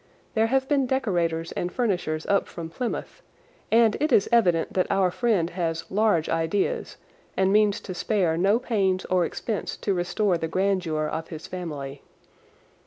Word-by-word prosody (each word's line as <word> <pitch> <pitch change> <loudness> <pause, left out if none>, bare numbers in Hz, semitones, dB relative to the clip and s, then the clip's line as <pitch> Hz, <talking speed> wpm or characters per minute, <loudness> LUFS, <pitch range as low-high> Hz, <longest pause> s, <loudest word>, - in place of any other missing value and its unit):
There 220 0 +2
have 265 +2 +1
been 275 -3 +2
decorators 175 -11 0
and 175 - -3
furnishers 180 -9 -1
up 200 - +1
from 165 -1 -7
Plymouth, 240 +8 -4 0.5
and 225 -1 +5
it 305 +2 0
is 200 - +4
evident 180 -9 +3
that 185 - +1
our 195 -2 +2
friend 190 -6 +1
has 165 -2 -3
large 205 -6 +2
ideas 195 - -1 0.4
and 190 +1 +3
means 210 -1 +3
to 185 - -6
spare 180 -2 +1
no 195 +6 +3
pains 195 -6 0
or 180 -2 +2
expense 215 +3 -4
to 200 - -1
restore 180 +1 0
the 160 - -2
grandeur 180 -4 0
of 160 +1 -4
his 160 -1 -8
family. 145 -6 -6
185 Hz, 160 wpm, -25 LUFS, 165-215 Hz, 0.5 s, and